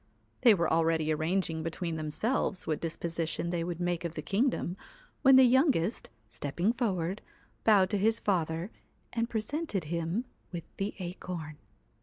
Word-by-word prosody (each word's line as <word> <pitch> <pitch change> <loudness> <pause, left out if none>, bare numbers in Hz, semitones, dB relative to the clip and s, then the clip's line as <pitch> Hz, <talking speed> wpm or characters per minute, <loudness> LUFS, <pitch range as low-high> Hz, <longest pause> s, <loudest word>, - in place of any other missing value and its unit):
They 235 -4 +7
were 170 -2 +1
already 160 -1 +2
arranging 160 +1 0
between 165 +1 -3
themselves 180 - -1
what 155 - -1
disposition 165 0 -2
they 170 -1 -1
would 175 0 -4
make 175 -1 -1
of 170 -1 -4
the 155 - -4
kingdom, 195 - 0 0.5
when 270 -1 +7
the 265 - +9
youngest, 255 - +3 0.2
stepping 160 - -1
forward, 195 -6 -1 0.4
bowed 200 -4 +5
to 205 - +1
his 220 +3 +3
father, 170 0 -1 0.4
and 230 0 0
presented 220 - -2
him 170 +8 -2 0.3
with 170 -2 -5
the 195 +1 -2
acorn. 175 -4 -6
175 Hz, 145 wpm, -30 LUFS, 165-215 Hz, 0.5 s, the